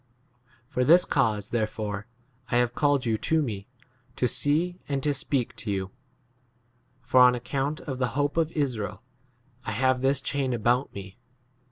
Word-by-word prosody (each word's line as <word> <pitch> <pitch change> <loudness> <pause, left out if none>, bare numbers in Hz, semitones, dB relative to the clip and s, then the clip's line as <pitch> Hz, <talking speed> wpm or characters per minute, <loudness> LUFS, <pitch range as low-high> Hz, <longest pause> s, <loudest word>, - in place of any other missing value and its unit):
For 130 -2 0
this 170 +7 +6
cause 110 -6 0
there 110 -3 +1
fore 105 -1 -5 0.4
I 120 - +2
have 120 -1 +2
called 145 -3 +2
you 110 -2 0
to 160 -1 +1
[me] 105 -6 -5 0.5
to 125 - +1
see 165 +8 0
and 135 -2 -1
to 145 - +2
speak 135 -2 -2
to 110 - -4
you; 95 -1 -2 1.1
for 130 +1 +3
on 125 0 +7
account 135 +4 -2
of 135 -3 -5
the 125 - +2
hope 145 0 +1
of 165 -1 +1
Israel 125 - -2 0.6
I - - -4
21 - - -2
have 130 +1 +2
this 135 +1 +2
chain 135 -2 -1
about 120 +3 +1
me. 95 +2 -9
130 Hz, 170 wpm, -27 LUFS, 110-145 Hz, 1.1 s, on